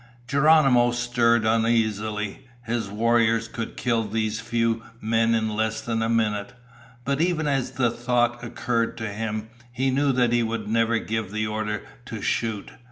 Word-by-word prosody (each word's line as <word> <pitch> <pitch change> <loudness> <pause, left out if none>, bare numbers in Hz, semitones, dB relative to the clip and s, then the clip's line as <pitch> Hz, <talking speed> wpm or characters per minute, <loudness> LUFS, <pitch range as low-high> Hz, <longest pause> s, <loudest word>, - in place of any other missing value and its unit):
Geronimo 140 -3 +5
stirred 120 -1 +2
uneasily. 110 -1 0 0.2
His 115 -3 -2
warriors 115 +1 +2
could 115 0 -6
kill 115 -2 +1
these 110 0 -2
few 115 0 0 0.2
men 115 +1 +2
in 110 -1 0
less 110 0 0
than 115 0 -2
a 115 - 0
minute. 110 -1 0 0.5
But 140 +2 0
even 170 -2 +1
as 135 -3 0
the 125 -3 +1
thought 120 0 0
occurred 115 -1 -1
to 115 -2 -3
him, 110 +1 -4 0.2
he 130 +2 0
knew 140 +1 +2
that 125 -2 +2
he 120 - +3
would 115 -2 -3
never 115 +1 +2
give 110 -3 -3
the 110 +1 -1
order 105 -1 -3 0.2
to - - -6
shoot. 110 -3 -2
115 Hz, 160 wpm, -24 LUFS, 110-120 Hz, 0.5 s, Geronimo